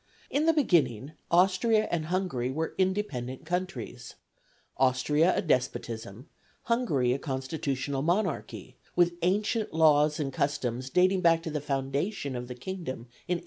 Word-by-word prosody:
In 300 +3 +1
the 325 - +6
beginning 150 - +2 0.2
Austria 195 +5 +3
and 165 -2 -1
Hungary 175 -9 -1
were 160 +5 -2
independent 185 -10 -1
countries 155 -9 -4 0.6
Austria 135 +6 +3
a - - 0
despotism, 120 - -2 0.4
Hungary 160 - +1
a 135 - -2
constitutional 135 0 -3
monarchy, 175 +2 -2 0.2
with 175 0 +4
ancient 210 +5 0
laws 150 -1 +4
and 135 -3 -2
customs 130 -3 -1
dating 185 +5 +3
back 165 -2 +4
to 160 - -4
the 150 -1 -2
foundation 140 +3 -2
of 125 0 -5
the 125 - -7
kingdom 130 -5 -6 0.2
in 180 - +1
895. - - -8
150 Hz, 140 wpm, -28 LUFS, 130-185 Hz, 0.6 s, the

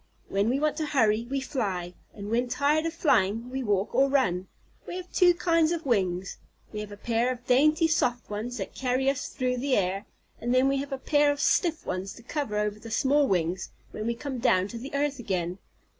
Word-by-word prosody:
When 200 +3 +1
we 260 +3 +1
want 300 0 0
to 315 - -1
hurry, 225 -5 +2
we 275 0 -1
fly; 195 -10 -3 0.2
and 205 0 -7
when 240 +2 +1
tired 295 +5 +1
of 330 - -4
flying, 230 - +1
we 265 +1 -2
walk 205 -4 0
or 270 +3 +4
run. 190 -10 +1 0.4
We - - -5
have 365 0 -7
two 355 -2 +5
kinds 335 -2 +2
of 335 -2 -2
wings. 190 -6 0 0.4
We 210 - -4
have 210 -1 -6
a 205 - -9
pair 235 +3 0
of 245 -1 -7
dainty, 305 +6 +4
soft 245 -6 0
ones, 220 +4 -4
that 195 - -5
carry 265 +1 +1
us 280 0 -4
through 250 -2 -2
the 265 +1 +1
air, 195 +1 -1 0.3
and 240 +2 0
then 255 +1 +4
we 275 0 +2
have 280 +1 -4
a 270 - -2
pair 290 +1 +3
of 285 - -4
stiff 325 +1 +1
ones 185 +1 -3
to 235 - -14
cover 255 -5 -3
over 210 0 -1
the 225 - -10
soft 280 +4 +2
wings 180 0 0 0.2
when 215 - -4
we 235 - 0
come 260 +1 -5
down 190 -6 +3
to 235 - -6
the 270 +4 -7
earth 280 -1 0
again. 185 -4 -2
250 Hz, 220 wpm, -27 LUFS, 210-285 Hz, 0.4 s, two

